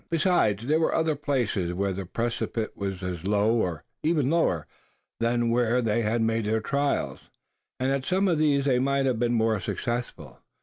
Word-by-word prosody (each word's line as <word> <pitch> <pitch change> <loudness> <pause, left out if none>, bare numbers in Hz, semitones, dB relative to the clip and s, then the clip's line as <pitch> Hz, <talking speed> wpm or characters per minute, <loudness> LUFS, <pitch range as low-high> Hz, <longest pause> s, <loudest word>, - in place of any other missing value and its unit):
Besides, 165 - +2
there 155 +4 +2
were 160 - +1
other 160 -1 +1
places 120 - -1
where 100 +1 0
the 95 -1 -5
precipice 115 0 -2
was 95 -2 -5
as 90 -3 -4
low, 105 +3 +2
and 85 -4 -3 0.2
even 155 -4 +1
lower, 90 - +1 0.5
than 115 0 +1
where 120 0 +2
they 115 -1 +1
had 115 +1 0
made 115 -1 0
the 110 +1 +1
trials; 140 +6 -2 0.5
and 130 +1 +1
at 135 -1 0
some 190 +6 +1
of 170 -4 +2
these 145 -3 +2
they 130 -3 +3
might 140 +1 +1
have 125 -4 0
been 120 0 +1
more 110 -2 +2
successful. 95 - -4
120 Hz, 180 wpm, -26 LUFS, 105-140 Hz, 0.5 s, they